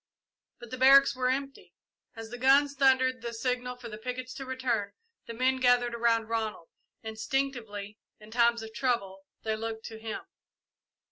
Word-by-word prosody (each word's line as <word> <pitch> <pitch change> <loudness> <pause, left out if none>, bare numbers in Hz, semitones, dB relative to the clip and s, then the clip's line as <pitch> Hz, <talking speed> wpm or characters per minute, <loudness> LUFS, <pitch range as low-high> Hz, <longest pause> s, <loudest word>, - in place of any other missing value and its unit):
But 240 - -12
the 255 - -5
barracks 275 +1 +7
were 255 0 0
empty. 275 +1 -4 0.4
As 225 0 -9
the 245 - -7
guns 275 +2 +5
thundered 260 -2 +3
the 235 0 -5
signal 250 +1 -2
for 245 -1 -10
the 215 -1 -8
pickets 255 +2 -5
to 270 - -8
return, 245 -6 -2 0.3
the 230 - -6
men 260 +2 +2
gathered 245 -1 +3
around 230 -1 +1
Ronald. 220 -6 -3 0.3
Instinctively, 220 -3 -3 0.2
in 215 0 -14
times 235 0 +3
of 220 0 -9
trouble, 195 -7 -2 0.2
they 220 -1 -1
looked 225 0 -5
to 225 -1 -8
him. 220 -1 -5
240 Hz, 160 wpm, -29 LUFS, 225-260 Hz, 0.4 s, barracks